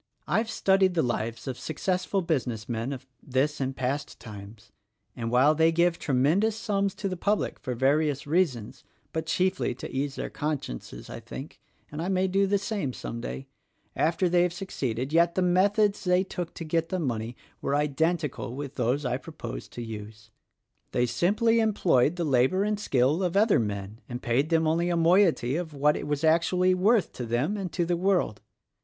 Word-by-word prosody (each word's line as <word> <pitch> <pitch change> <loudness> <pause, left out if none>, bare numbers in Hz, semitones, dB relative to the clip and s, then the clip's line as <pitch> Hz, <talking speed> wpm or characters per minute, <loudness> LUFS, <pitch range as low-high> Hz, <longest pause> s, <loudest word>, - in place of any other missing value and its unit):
"I've 225 0 +1
studied 190 -3 +3
the 160 - +3
lives 115 0 -3
of 130 -2 -4
successful 185 +4 -1
business 125 -10 -2
men 115 +2 -2
of 130 -2 -6 0.2
this 140 +3 0
and 135 0 -2
past 135 +3 -3
times; 105 -1 -11 0.4
and 115 -1 -3
while 130 +5 +5
they 160 +1 +4
give 170 +1 +2
tremendous 155 - +2
sums 200 -3 -1
to 200 - -3
the 185 - -3
public 205 +4 -1
for 125 -3 -4
various 145 +3 +1
reasons 145 - 0 0.3
(but 160 0 -3
chiefly 185 -3 0
to 130 - -8
ease 140 +1 -1
their - - -5
consciences, 145 - -4
I - - -7
think, - - -9
— - - -37
and 150 +2 -5
I 175 - -2
may 190 0 +1
do 195 +1 +2
the 200 +1 +2
same 195 - -3
some 115 0 -6
day) 135 - -5 0.5
after 165 +3 +2
they 175 0 +3
have 175 -1 +1
succeeded, 135 - -3
yet 170 +1 +4
the 185 - +2
methods 200 +3 +3
they 180 0 +3
took 175 -3 -6
to - - -6
get 165 +1 -1
the 185 - -1
money 120 -7 -2 0.3
were 140 - 0
identical 150 -2 -1
with 140 0 -6
those 130 +3 0
I 125 0 0
propose 135 - -8
to 120 - -7
use. 110 0 -9 0.6
They 120 - +2
simply 210 - +2
employed 175 - +3
the 175 - -2
labor 135 +7 +3
and 210 0 -1
skill 140 -1 +2
of 180 0 0
other 215 +1 +4
men 105 0 -4
and 120 0 -4
paid 130 +5 0
them 165 -1 +3
only 165 +3 +1
a 175 - +1
moiety 165 -6 +3
of 165 -4 -5
what 150 +2 +3
it - - -5
was 145 +1 -1
actually 175 +3 +3
worth 200 +3 +2
to 125 - -5
them 125 - 0
and 195 -3 -4
to 175 - 0
the 175 +1 +1
world. 180 - +1
160 Hz, 190 wpm, -27 LUFS, 125-185 Hz, 0.6 s, while